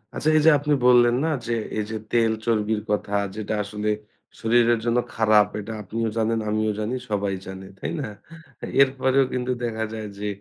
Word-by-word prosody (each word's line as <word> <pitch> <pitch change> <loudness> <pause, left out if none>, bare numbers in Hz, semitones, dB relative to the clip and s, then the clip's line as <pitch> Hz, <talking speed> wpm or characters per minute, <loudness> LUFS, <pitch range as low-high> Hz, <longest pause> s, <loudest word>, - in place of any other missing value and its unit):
আচ্ছা। 155 - 0
এই - - +4
যে - - +9
আপনি 150 +1 0
বললেন 120 -1 +6
না? - - +1 0.2
যে 120 - 0 0.2
এই 105 - 0
যে 110 - -2 0.2
তেল 115 -1 +3
চর্বির 110 -2 +1
কথা 105 -1 -1 0.2
যেটা 110 0 -3
আসলে 105 +1 -3 0.5
শরীরের 120 0 +3
জন্য 120 +1 +2 0.2
খারাপ 110 -3 +4
এটা 110 +2 -6
আপনিও 110 +3 -2
জানেন, 115 0 +1
আমিও 110 0 +1
জানি। 110 +4 -2
সবাই 100 -2 -1
জানে। 95 0 -8
তাই - - -4
না? - - -4 0.7
এরপরেও 130 0 +3
কিন্তু 125 0 -1
দেখা 110 -1 -2
যায় 110 -1 -5
যে 105 - -3
110 Hz, 180 wpm, -24 LUFS, 105-120 Hz, 0.7 s, যে